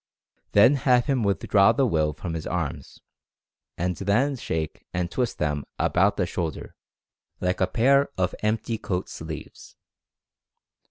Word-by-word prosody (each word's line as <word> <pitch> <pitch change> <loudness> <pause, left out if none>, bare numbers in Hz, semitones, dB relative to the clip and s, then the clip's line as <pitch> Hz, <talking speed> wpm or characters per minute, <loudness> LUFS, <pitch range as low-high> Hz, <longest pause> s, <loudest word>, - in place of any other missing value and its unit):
Then 120 +8 +6
have 125 -2 +3
him 135 -4 +1
withdraw 100 +1 +3
the 135 +3 +2
Will 80 -9 +1
from 80 +3 -6
his 80 -1 -4
arms, 85 -6 -4 0.8
and 90 +1 -1
then 115 +9 +1
shake 80 - -4
and 90 -1 -1
twist 125 -3 -1
them 75 -1 -1
about 100 +3 +2
from 95 - 0
the - - 0
shoul 85 -1 -2
der, - - -10 0.7
like 90 +1 -1
a 95 - +3
pair 140 +4 +3
of 90 -1 0
empty 110 +1 -1
coat 90 -1 -3
sleeves. - - -9
100 Hz, 150 wpm, -25 LUFS, 85-120 Hz, 0.8 s, Then